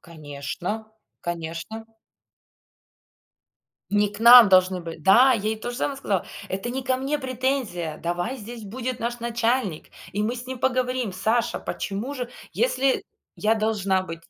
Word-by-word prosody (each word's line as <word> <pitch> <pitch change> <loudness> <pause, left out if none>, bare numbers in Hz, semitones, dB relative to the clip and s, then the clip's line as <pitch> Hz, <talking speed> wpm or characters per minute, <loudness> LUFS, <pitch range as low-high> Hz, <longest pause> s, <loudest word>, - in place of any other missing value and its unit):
Конечно 160 +7 -6 0.3
конечно. 170 +6 -5 2.1
Не 205 0 +3
к 205 - -9
нам 235 -2 +10
должны 185 -1 +4
были 165 -1 -7
Да, 240 - +6
я 220 - -1
ей 220 - -1
то 240 - -4
же 240 - -6
самое 275 0 -1
сказала: 200 -9 -1 0.2
"Это 195 +5 -3
не 260 +1 -3
ко 260 0 +1
мне 275 +3 -1
претензия. 255 - -2
Давай 175 +10 -2
здесь 230 +1 -9
будет 245 +4 -4
наш 240 +1 -3
начальник 235 -6 -1 0.3
и 205 - 0
мы 230 +4 -1
с 245 +1 -7
ним 260 -1 -6
поговорим. 255 -4 0
Саша, 220 +5 0
почему 210 +8 -4
же, 250 -3 -5 0.2
если 275 - +1 0.3
я 220 +1 +2
должна 200 -4 +1
быть". 165 -2 -7
225 Hz, 150 wpm, -24 LUFS, 185-255 Hz, 2.1 s, нам